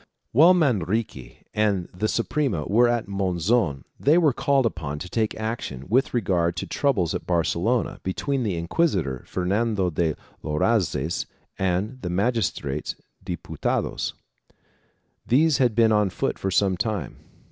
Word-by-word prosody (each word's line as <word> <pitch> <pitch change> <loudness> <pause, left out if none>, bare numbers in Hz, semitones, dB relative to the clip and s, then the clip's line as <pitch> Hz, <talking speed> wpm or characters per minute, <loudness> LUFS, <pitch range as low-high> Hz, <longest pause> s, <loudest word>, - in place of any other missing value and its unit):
2 - - -7
While 170 +4 +9
Manrique 110 - -1
and 100 -4 +1
the 100 +4 -1
Suprema 115 - -1
were 120 +4 +4
at 120 -3 0
Monzon, 95 - 0 0.2
they 150 +4 +4
were 155 -6 +4
called 135 0 +2
upon 75 -9 -3
to 90 - -6
take 110 +3 -1
action 110 - -4
with 130 +5 +2
regard 90 -7 +1
to - - -3
troubles 110 - 0
at - - -5
Barcelona 90 +7 0
between 135 +9 -2
the 105 -6 -1
inquisitor, 85 - 0
Fernando 100 0 0
de 80 -1 0 0.3
Loazes 80 - 0 0.3
and 95 +7 -1
the 90 - -3
magistrates 90 - -1
and - - -33 0.3
Diputados. - - -2 1.1
These 150 +4 +3
had 120 -5 +3
been 115 -1 +4
on 105 -2 +3
foot - - -2
for 95 - -1
some 95 -1 +2
time. 100 - -3
100 Hz, 140 wpm, -24 LUFS, 85-120 Hz, 1.1 s, While